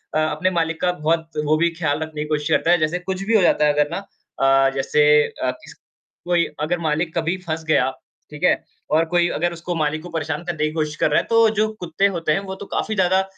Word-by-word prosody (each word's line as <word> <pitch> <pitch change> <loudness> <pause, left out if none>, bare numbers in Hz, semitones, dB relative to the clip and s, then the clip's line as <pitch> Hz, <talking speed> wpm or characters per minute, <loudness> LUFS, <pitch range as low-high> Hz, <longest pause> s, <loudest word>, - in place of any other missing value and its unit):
अ, - - +3
अपने 155 +4 0
मालिक 165 -1 -1
का 180 - +2
बहुत 165 0 -1 0.2
वो 155 +1 +3
भी 170 +1 +2
ख़्याल 160 -3 -2
रखने 155 -1 -6
की 150 - -4
कोशिश 150 -1 -1
करता 170 - +2
है, 175 - +5
जैसे 155 +3 0
कुछ 190 +1 -4
भी 225 +2 +1
हो 205 - +5
जाता 150 -3 +3
है 150 - +3
अगर 150 0 +1
ना - - -2 0.4
अ, 135 0 +4
जैसे 140 +2 +2 0.4
अ, 130 - +1
किस - - -14 0.5
कोई 175 -1 +2
अगर 170 +3 -1
मालिक 160 +1 -1
कभी 165 +3 0
फँस 160 0 -3
गए 155 - +3
आप। 130 0 -6 0.3
ठीक 150 - -9
है? - - +3 0.3
और 165 +1 +4
कोई 175 +1 +2
अगर 175 +2 0
उसको 170 +1 -5
मालिक 155 0 -1
को 175 - -8
परेशान 160 0 -3
करने 155 -3 -2
की 155 - -1
कोशिश 155 -1 -2
कर - - +1
रहा - - +4
है - - -4
तो 230 -1 +5
जो 215 +1 +2
कुत्ते 180 +3 +1
होते 165 -2 -1
हैं 155 - +2
वो 190 - -4
तो 200 - -9
काफ़ी 220 - -1
ज़्यादा 190 0 +3
165 Hz, 250 wpm, -21 LUFS, 150-175 Hz, 0.5 s, है